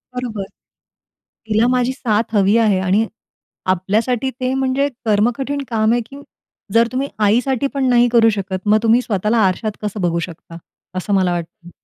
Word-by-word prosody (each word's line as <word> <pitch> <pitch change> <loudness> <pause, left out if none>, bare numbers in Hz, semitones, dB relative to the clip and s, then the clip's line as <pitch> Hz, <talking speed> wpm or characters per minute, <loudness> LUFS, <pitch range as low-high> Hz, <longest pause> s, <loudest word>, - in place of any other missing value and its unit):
बरोबर. 235 -5 -4 1.0
तिला 220 +2 +2
माझी 250 0 +1
साथ 225 -4 -1
हवी 200 +2 +4
आहे 215 -5 +3
आणि 190 +4 +1 0.7
आपल्यासाठी 220 +7 -1
ते 255 0 -1
म्हणजे 265 +1 +1 0.2
कर्म-कठीण 245 +7 0
काम 220 -1 +1
आहे 240 - +1
की 280 +1 -11 0.5
जर 230 0 +4
तुम्ही 265 +2 -2 0.2
आईसाठी 250 +5 +1
पण 270 -1 0
नाही 245 0 +4
करू 230 -1 +5
शकत, 195 -3 -3
मग 210 +1 +5
तुम्ही 230 +2 +4
स्वतःला 215 -1 0
आरशात 215 +4 -2
कसं 210 -1 -4
बघू 170 -1 0
शकता? 165 -1 -8 0.4
असं 200 +3 -2
मला 185 -2 +2
वाटतं. 170 0 -7
225 Hz, 155 wpm, -18 LUFS, 200-250 Hz, 1.0 s, करू